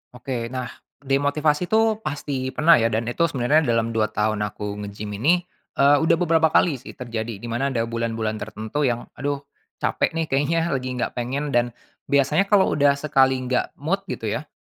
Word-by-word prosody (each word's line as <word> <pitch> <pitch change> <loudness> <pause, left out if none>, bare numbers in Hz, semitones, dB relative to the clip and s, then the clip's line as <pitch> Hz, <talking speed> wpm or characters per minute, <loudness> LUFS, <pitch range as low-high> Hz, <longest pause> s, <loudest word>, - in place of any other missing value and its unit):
Oke. 125 -2 -4
Nah, 125 -1 -5 0.3
demotivasi 145 +4 +1
itu 220 +2 +2
pasti 140 -6 -3
pernah 165 0 +6
ya 115 - +3
dan 115 0 -1
itu 170 +6 +2
sebenarnya 145 +1 +2
dalam 115 -1 +1
2 110 -1 +1
tahun 105 0 -1
aku 105 0 -5
nge-gym 105 +1 -6
ini, 175 +9 +3 0.3
eee, 140 +1 +5
udah 160 - +3
beberapa 165 -2 +3
kali 155 -3 +2
sih - - -11
terjadi 115 -2 -4
di 120 - -5
mana 120 +4 -1
ada 120 -4 0
bulan-bulan 115 -2 -2
tertentu 110 +7 -2
yang 120 -1 -1 0.2
"Aduh 140 0 -2 0.4
capek - - 0
nih 165 0 0
kayaknya 145 +5 +2
lagi 130 -1 -2
enggak 125 - -2
pengen." 135 +4 -2
Dan 120 -1 +1 0.3
biasanya 140 +7 +2
kalau 200 -2 +4
udah 140 -1 +3
sekali 135 -2 +3
enggak 130 -1 -2
mood 170 +8 -1
gitu 110 - -3
ya, 150 +4 -4
130 Hz, 180 wpm, -23 LUFS, 115-150 Hz, 0.4 s, pernah